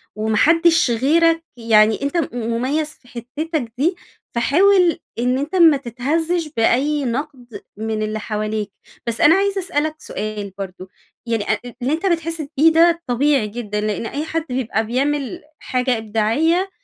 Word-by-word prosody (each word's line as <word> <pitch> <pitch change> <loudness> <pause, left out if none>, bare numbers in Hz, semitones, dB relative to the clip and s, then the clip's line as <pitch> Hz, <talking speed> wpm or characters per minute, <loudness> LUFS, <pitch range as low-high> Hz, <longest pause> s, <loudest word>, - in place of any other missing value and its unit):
وما 215 0 -1
حدش 330 0 +4
غيرك 325 +7 +3
يعني 220 -1 +3
أنتَ 280 +5 -1
م 325 - +1
مميز 250 +6 -1
في 265 - -18
حتتك 255 +2 -4
دي، 340 +7 +1 0.4
فحاول 355 +7 +3 0.2
إن 250 +2 +1
أنتَ 295 +7 -3
ما 325 -5 +6
تتهزش 310 +7 -1
بأي 275 +5 +2
نقد 250 -1 -5 0.2
من 220 0 -3
اللي 215 0 -3
حواليك. 215 -1 -3 0.4
بس 230 -1 -1
أنا 325 - +7
عايزة 395 0 +1
أسألك 310 -3 -1
سؤال 210 -7 -5
برضو، 185 -1 -7 0.4
يعني 230 -3 -1
أ 215 - +2 0.2
اللي 265 +5 0
أنتَ 330 +5 -2
بتحس 330 -2 -1 0.2
بيه 320 +3 +6
ده 335 +1 +4
طبيعي 260 -1 +2
جدًا، 210 -1 -4
لأن 210 +1 -2
أي 290 +6 -4
حد 325 0 -3
بيبقى 245 -3 -1
بيعمل 280 +7 -2 0.2
حاجة 250 -1 0
إبداعية 230 - +1
265 Hz, 150 wpm, -20 LUFS, 225-325 Hz, 0.4 s, أنا